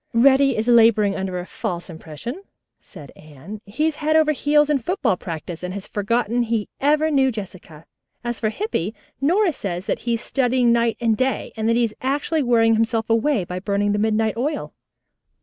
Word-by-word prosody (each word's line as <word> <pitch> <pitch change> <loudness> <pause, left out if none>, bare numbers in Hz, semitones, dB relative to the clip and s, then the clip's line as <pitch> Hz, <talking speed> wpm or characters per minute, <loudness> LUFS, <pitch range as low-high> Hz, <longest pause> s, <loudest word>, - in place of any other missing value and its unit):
"Reddy 270 +2 +4
is 220 +2 -1
laboring 225 -4 +5
under 190 -1 -3
a 180 - -5
false 175 -1 -5
impression," 165 - -8 0.4
said 150 -8 -13
Anne. 155 +8 -11
"He 250 +10 -1
is 315 -2 -1
head 310 +1 0
over 310 -1 +4
heels 295 +1 +2
in 295 -2 +1
football 345 - 0
practice 165 -1 -7
and 180 +1 -5
has 200 - -6
forgotten 230 +3 -1
he 225 -3 -1
ever 300 +3 +2
knew 265 -2 +3
Jessica. 185 -7 -9 0.4
As 240 -1 -3
for 215 - 0
Hippy, 220 - -3 0.3
Nora 350 +5 +2
says 185 -6 -5
that - - -1
he 235 -1 -1
is 230 - -5
studying 250 -2 +1
night 235 -1 +2
and 230 -2 +2
day, 260 +3 -2
and 220 0 -1
that 230 - +3
he 240 - +2
is 225 -2 -1
actually 285 +4 0
wearing 230 -3 +3
himself 225 0 0
away 230 -1 +2
by 180 +1 -5
burning 200 +1 0
midnight 220 0 +1
oil." 290 +5 -3
230 Hz, 185 wpm, -22 LUFS, 200-270 Hz, 0.4 s, laboring